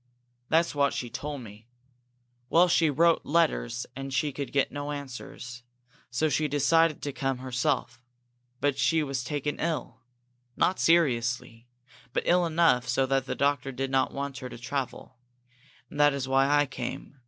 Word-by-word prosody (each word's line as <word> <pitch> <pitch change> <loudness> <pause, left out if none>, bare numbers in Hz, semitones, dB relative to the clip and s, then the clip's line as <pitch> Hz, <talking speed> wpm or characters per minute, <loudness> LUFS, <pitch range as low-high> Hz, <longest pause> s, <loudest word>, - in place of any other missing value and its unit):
"That's 165 +1 +3
what 140 -1 +2
she 120 -2 -4
told 145 -2 -5
me. 110 0 -13 0.8
Well, 175 +2 +5
she 165 -2 +3
wrote 165 +4 +3
letters 120 - +1
and 135 +1 -6
she 145 +2 0
could 140 0 -5
get 140 -1 +1
no 145 +1 -4
answers. 125 -3 -7 0.5
So 125 +6 +1
she 150 +1 +1
decided 155 +2 +2
to 145 - -3
come 135 -1 -1
herself. 125 -1 -2 0.6
But 145 -1 0
she 155 +5 +3
was 135 -3 -3
taken 145 +1 -3
ill. 155 -7 -3 0.6
Not 185 - +2
seriously, 125 -7 +1 0.5
but - - 0
ill 175 0 +3
enough 160 -7 +3
so 125 +2 +2
that 135 0 0
the - - -2
doctor 140 -1 0
did 135 +1 -3
not 130 -1 +2
want 140 -1 -4
her 130 - -7
to - - -9
travel. 130 0 -5 0.7
And 145 - -9
that 145 -1 +5
was 135 -2 -3
why 135 +1 +3
I 145 0 +4
came. 135 +1 -7
140 Hz, 165 wpm, -28 LUFS, 125-150 Hz, 0.8 s, Well